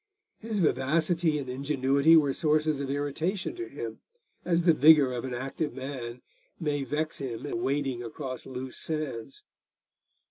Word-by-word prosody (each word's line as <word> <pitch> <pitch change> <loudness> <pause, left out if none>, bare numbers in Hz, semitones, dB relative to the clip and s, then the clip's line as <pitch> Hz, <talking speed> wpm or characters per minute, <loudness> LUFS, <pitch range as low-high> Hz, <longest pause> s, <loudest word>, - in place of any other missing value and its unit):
His 220 -1 -3
vivacity 160 +1 +2
and 140 -3 -4
ingenuity 140 +3 +3
were 145 -3 +3
sources 155 -1 +1
of 140 -1 -3
irritation 145 +7 -2
to 355 0 -5
him, - - -6 0.4
as 170 -1 +1
the 170 -1 +6
vigour 150 -3 +6
of 120 +1 -3
an 125 -2 -4
active 135 +2 -3
man 130 -3 -6 0.4
may 145 -4 -1
vex 150 +4 -2
him 125 -2 -5
in 175 +4 -3
wading 135 -4 -1
across 130 +2 -6
loose 130 0 -6
sands. 135 -6 -4
145 Hz, 145 wpm, -28 LUFS, 130-160 Hz, 0.4 s, the